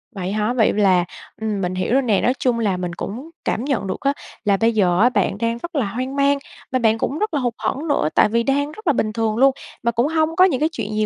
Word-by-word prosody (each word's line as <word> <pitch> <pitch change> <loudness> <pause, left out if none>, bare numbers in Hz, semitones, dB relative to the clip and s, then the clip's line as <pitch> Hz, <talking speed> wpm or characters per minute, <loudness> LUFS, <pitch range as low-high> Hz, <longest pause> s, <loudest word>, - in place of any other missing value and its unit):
Vậy 185 -1 -3
hả? 215 +3 0
Vậy 235 -4 +3
là, 190 -4 +3 0.4
ừm, 215 -3 -2
mình 180 0 -2
hiểu 185 +5 -1
rồi 270 - +4
nè, 220 -7 +1
nói 250 - +2
chung 245 -3 +1
là 200 -5 0
mình 180 -1 -4
cũng 240 - -6 0.2
cảm 225 - -1
nhận 245 -9 -1
được 185 - -3
á, 275 0 +1 0.3
là 200 -1 +3
bây 225 +3 +2
giờ 185 -5 +2
á, 245 - +6
bạn 245 - 0
đang 230 +1 -1
rất 340 +8 -8
là 270 -6 +1
hoang 255 +7 -4
mang 280 0 +3 0.3
và 255 - +1
bạn 225 -2 +3
cũng 280 +6 -2
rất 425 -3 -1
là 290 - +1
hụt 245 -3 -1
hẫng 285 +5 -3
nữa 220 - +1
tại - - +5
vì 235 +2 +1
đang 285 +3 0
rất 435 +5 -12
là 300 - +5
bình 215 -4 -1
thường 225 -1 0
luôn, 270 +2 +5 0.3
mà 235 - +2
cũng 235 +4 +1
hông 320 +1 0
có 370 - +6
những 300 -9 +1
cái 310 +2 +2
chuyện 215 -6 -4
gì 215 0 +1
235 Hz, 280 wpm, -21 LUFS, 210-275 Hz, 0.4 s, á